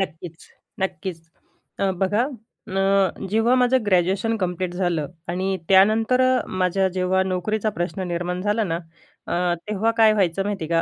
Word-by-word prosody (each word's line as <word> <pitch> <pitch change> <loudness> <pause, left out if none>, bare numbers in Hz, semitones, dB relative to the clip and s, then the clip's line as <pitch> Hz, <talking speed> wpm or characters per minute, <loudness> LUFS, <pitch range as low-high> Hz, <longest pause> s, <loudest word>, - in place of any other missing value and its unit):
नक्कीच, 165 -2 -5 0.4
नक्कीच. 185 -2 -3 0.6
तर 195 -1 +1
बघा 205 +6 +2 0.4
ना, 195 +1 -1 0.5
जेव्हा 225 +4 +3
माझं 250 +1 +4
ग्रॅज्युएशन 195 +4 +2
कंप्लीट 180 -1 -2
झालं 175 -5 -1 0.2
आणि 190 +2 -1
त्यानंतर 220 +6 +4
अ, 255 -1 +2
माझ्या 185 +1 +1
जेव्हा 185 0 +1
नोकरीचा 200 +4 -1
प्रश्न 185 +2 -2
निर्माण 175 +1 -2
झाला 210 +2 +1
ना. 165 -3 -2 0.5
अ, 175 0 0
तेव्हा 215 +2 +1
काय 220 -2 +6
व्हायचं 195 -2 +1
माहिती 200 -4 -3
आहे 155 - -6
190 Hz, 145 wpm, -23 LUFS, 180-215 Hz, 0.6 s, काय